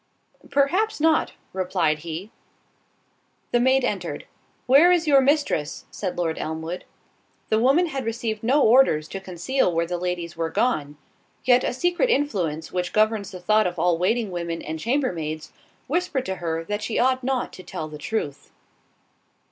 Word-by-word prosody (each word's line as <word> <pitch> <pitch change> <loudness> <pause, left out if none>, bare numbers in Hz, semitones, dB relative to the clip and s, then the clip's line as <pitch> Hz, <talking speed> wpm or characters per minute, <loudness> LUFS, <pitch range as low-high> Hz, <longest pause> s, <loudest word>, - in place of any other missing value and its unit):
"Perhaps 365 +11 +1
not," 315 +1 +2 0.2
replied 180 -5 0
he. 170 +6 -6 1.2
The 240 - +3
maid 260 +2 +3
entered. - - -3 0.4
"Where 285 +8 +6
is 345 -2 +3
your 280 -3 +6
mistress?" 275 - 0
said 185 -3 -4
Lord 165 -2 -1
Elmwood. 160 +3 -4 0.6
The 220 - +3
woman 275 +9 +4
had 275 -5 -4
received 225 -1 -3
no 270 +6 +3
orders 220 -11 +5
to 195 - -5
conceal 190 +5 -1
where 165 0 0
the 175 +1 -3
ladies 175 -1 -3
were 165 -1 -2
gone, 245 +4 +2
and 145 +1 -15 0.5
yet 250 0 +5
a - - 0
secret 350 - +1
influence 180 - -1
which 180 -1 -2
governs 215 -2 +2
the 185 -3 -9
thoughts 215 +3 +3
of 175 - -12
all 170 0 +2
waiting 215 +3 +1
women 170 -1 -4
and 160 +1 -5
chambermaids, 170 - -2 0.3
whispered 310 -4 -1
to 190 0 -3
her 165 -1 -2
that 205 +4 -3
she 220 - -2
ought 255 +1 +2
not 260 -1 -1
to - - -10
tell 155 -3 -6
the 150 -1 -9
truth. 145 -5 -4
210 Hz, 165 wpm, -24 LUFS, 170-265 Hz, 1.2 s, Where